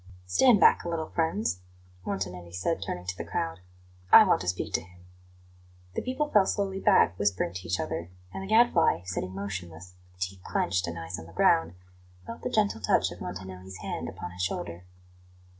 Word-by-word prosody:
"Stand 205 - +5
bark - - +6
a 175 - -4
little, 160 -2 -3
friends," 165 - 0 0.5
Montanelli 90 -3 -4
said, 95 - -1
turning 90 0 -4
to 90 0 -3
the - - -5
crowd; 80 +1 -3 0.5
"I - - +11
want - - +3
to 90 - -6
speak 90 0 -2
to - - +1
him." 90 0 -17 0.9
The - - -2
people 260 +4 -1
fell 200 -2 +5
slowly 195 -1 -1
back, 185 - +4
whispering 90 -4 0
to 90 +1 -7
each 90 - 0
other, 85 +1 -3 0.2
and - - -5
the 195 - -6
Gadfly, 215 - +4
sitting 90 0 -4
motionless, 90 -3 -6 0.2
with 90 0 -26
teeth 90 0 -6
clenched 90 -2 0
and 85 0 -5
eyes 85 +1 -5
on 80 - -10
the 85 - -14
ground, 80 +2 +3 0.5
felt 115 - -8
the - - -2
gentle 210 - +1
touch 95 - +2
of - - -10
Montanelli's 95 +1 -7
hand - - -4
upon 90 - -7
his 90 +1 -7
shoulder. 90 -1 -3
90 Hz, 190 wpm, -28 LUFS, -, 0.9 s, I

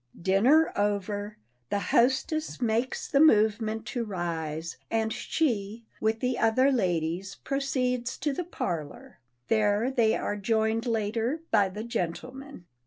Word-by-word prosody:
Dinner 235 - +4
over, 205 0 -1 0.3
the - - 0
hostess 260 - +1
makes 235 +1 -1
the 275 - +2
movement 220 -5 +3
to 240 -3 -1
rise, 165 -5 -4
and 220 -1 0
she, 230 -7 -1
with 220 +1 0
the 250 -1 0
other 255 +5 +4
ladies, 180 -4 -1
proceeds 255 -3 -1
to 295 - -1
the 355 - -3
parlor. 170 - -5 0.3
There 215 +2 +2
they 230 -4 +3
are 205 - -2
joined 220 +3 0
later 230 +6 -1
by 205 -3 +4
the 210 +3 -6
gentlemen. 235 - -5
220 Hz, 125 wpm, -28 LUFS, 200-255 Hz, 0.3 s, Dinner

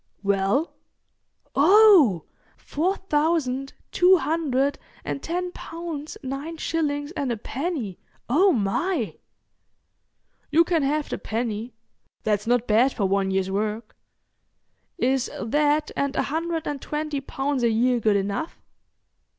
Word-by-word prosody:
"Well?" 200 - +1 0.8
"Oh! 320 - +6 0.3
Four 355 +6 -1
thousand 295 -6 0 0.2
two 370 +1 +5
hundred 285 -4 0 0.3
and 275 - -3
ten 355 +2 -3
pounds 330 -4 -7
nine 275 +5 -5
shillings 290 -2 -2
and 280 -7 -2
a 235 - -2
penny! 255 - -4 0.3
Oh 360 +11 +4
my!" 240 - -1 1.3
"You 325 +3 +5
can 335 -2 +1
have 295 +2 0
the - - -4
penny. 225 0 -3 0.5
That's 210 0 0
not 245 0 +2
bad 240 +5 +3
for 205 - -1
one 195 0 +1
year's 190 0 0
work. 215 +2 -3 1.0
Is 265 -3 +1
that 295 +5 +1
and 280 0 -1
a - - +1
hundred 330 0 -2
and 285 -2 -3
twenty 300 -2 -3
pounds 270 0 -2
a 235 - +3
year 240 +2 +2
good 215 -2 +2
enough?" 200 +11 -2
275 Hz, 125 wpm, -24 LUFS, 225-320 Hz, 1.3 s, Oh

